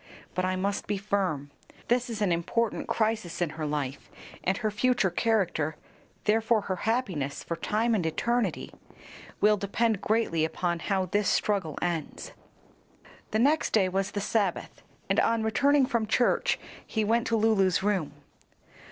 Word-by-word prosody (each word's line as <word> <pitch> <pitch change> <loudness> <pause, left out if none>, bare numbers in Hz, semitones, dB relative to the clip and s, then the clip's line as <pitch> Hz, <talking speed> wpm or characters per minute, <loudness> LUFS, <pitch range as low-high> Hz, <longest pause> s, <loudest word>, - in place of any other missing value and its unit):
But 185 - 0
I 185 0 0
must 195 +2 -2
be 205 - -1
firm. 190 -8 -1 0.4
This 245 +1 +1
is 215 -3 -2
an 190 - +2
important 200 +7 -1
crisis 215 -5 -1
in 175 -4 0
her 155 -1 -4
life, 145 -2 -3 0.3
and 190 +1 +1
her 215 -3 -1
future 230 -3 +2
character 175 -10 0 0.5
therefore 220 +1 +2
her 190 -2 -3
happiness 180 - -1
for 170 - -3
time 220 +7 0
and 205 -5 +1
eternity 235 +9 -1 0.7
will 210 0 +5
depend 205 +1 0
greatly 215 -8 +1
upon 170 +2 -1
how 190 +1 0
this 205 +2 +1
struggle 195 -8 0
ends." 170 -4 -3 1.0
The 215 - 0
next 290 +7 +2
day 195 -4 +4
was 195 +2 -1
the 205 -1 -3
Sabbath, 200 -3 -1 0.3
and - - +2
on 230 -1 +2
returning 280 +5 +3
from 235 -3 -1
church, 240 +3 +2 0.3
he 220 - -1
went 230 +2 +1
to 230 - +1
Lulu's 205 -4 +3
room. 190 -8 0
205 Hz, 150 wpm, -28 LUFS, 175-225 Hz, 1.0 s, will